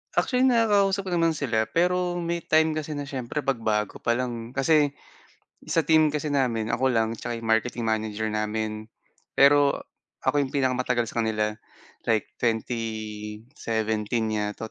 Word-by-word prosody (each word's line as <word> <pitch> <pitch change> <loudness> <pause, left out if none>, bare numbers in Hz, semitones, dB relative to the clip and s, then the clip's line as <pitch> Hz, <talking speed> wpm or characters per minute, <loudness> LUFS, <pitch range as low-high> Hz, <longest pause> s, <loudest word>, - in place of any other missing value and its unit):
Actually 255 +1 +3
nakakausap 205 -5 +3
ko 185 - -5
naman 165 -2 +2
sila 110 -6 0
pero 180 +5 +1
may 170 0 -2
time 160 -1 +3
kasi 155 -1 -4
na 145 - -3
siyempre 135 +1 -4
'pag 135 -3 0
bago 105 -2 -1
pa 115 - +1
lang 120 -1 -4
kasi, 145 +1 +3 0.7
sa 165 - +2
team 155 -1 +5
kasi 150 0 -2
namin 115 -5 0
ako 130 - +1
lang 115 -3 +1
'tsaka 115 +1 -4
yung 115 -1 -6
marketing 115 +1 +1
manager 110 -1 -1
namin. 110 0 -2 0.5
Pero 140 0 +5 0.5
ako 145 - +2
yung 135 -2 -1
pinakamatagal 125 -3 0
sa - - -2
kanila 110 -1 0 0.6
like, 110 -2 +1
2017 110 0 -2
yata 105 +1 -3
120 Hz, 145 wpm, -26 LUFS, 110-150 Hz, 0.7 s, team